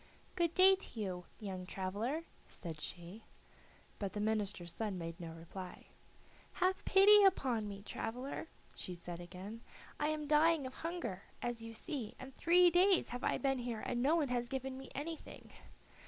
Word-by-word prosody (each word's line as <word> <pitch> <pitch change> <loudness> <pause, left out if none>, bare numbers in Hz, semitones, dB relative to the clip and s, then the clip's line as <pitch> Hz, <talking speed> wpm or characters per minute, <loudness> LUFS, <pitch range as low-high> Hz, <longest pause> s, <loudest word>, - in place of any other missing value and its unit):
"Good 340 -2 +1
day 380 +1 +8
to 375 - -9
you, 180 -4 -3
young 185 -3 -5
traveler," 205 - -2 0.2
said 160 -4 -7
she. 175 +7 -7 0.8
But 200 -2 -3
the 210 - -3
minister's 205 -5 -1
son 210 -2 -2
made 165 -1 -6
no 165 -2 -6
reply. 170 +3 -9 0.6
"Have 370 +1 +1
pity 410 +2 +8
upon 255 - +3
me, 200 -1 -7
traveler," 250 +9 -4 0.3
she 180 - -6
said 175 0 -7
again. 185 +6 -8 0.4
"I 295 - +2
am 305 -1 -1
dying 305 0 +4
of 260 - -6
hunger, 280 - -4 0.2
as 240 -1 -2
you 225 0 -7
see, 250 -5 -4
and 260 +1 -9
three 350 +3 +6
days 365 +1 +5
have 245 +1 -5
I - - +2
been 270 -2 +1
here 240 -3 -3
and 240 - -1
no 290 +6 +4
one 305 -5 +1
has 240 -1 -1
given 265 0 -3
me 265 0 -9
anything." 315 +3 -6
240 Hz, 170 wpm, -36 LUFS, 195-310 Hz, 0.8 s, day